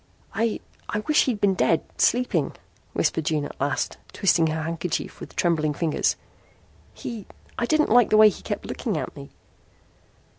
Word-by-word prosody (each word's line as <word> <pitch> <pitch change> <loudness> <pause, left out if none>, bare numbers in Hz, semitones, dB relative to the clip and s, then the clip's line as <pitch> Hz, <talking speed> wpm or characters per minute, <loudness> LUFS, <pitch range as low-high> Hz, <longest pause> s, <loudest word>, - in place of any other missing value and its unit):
"I 225 -1 0 0.3
I 210 - -1
wish 300 +7 +3
he'd 240 -6 -1
been 200 -1 +3
dead 165 -3 +2 0.2
sleeping," 250 +1 +2 0.4
whispered 160 - 0
June 150 -2 0
at - - -10
last, 140 -1 -1
twisting 170 -4 +3
her 155 0 -2
handkerchief 165 +1 -3
with - - -10
trembling 155 -4 +1
fingers. 165 -3 +1 0.8
"He 225 -5 -7 0.3
I 235 - 0
didn't 310 +2 +3
like 245 -1 +6
the 215 - +4
way 215 0 +9
he 200 - -8
kept - - -4
looking - - -3
at - - -4
me." 70 - -10
180 Hz, 160 wpm, -25 LUFS, 160-225 Hz, 0.8 s, way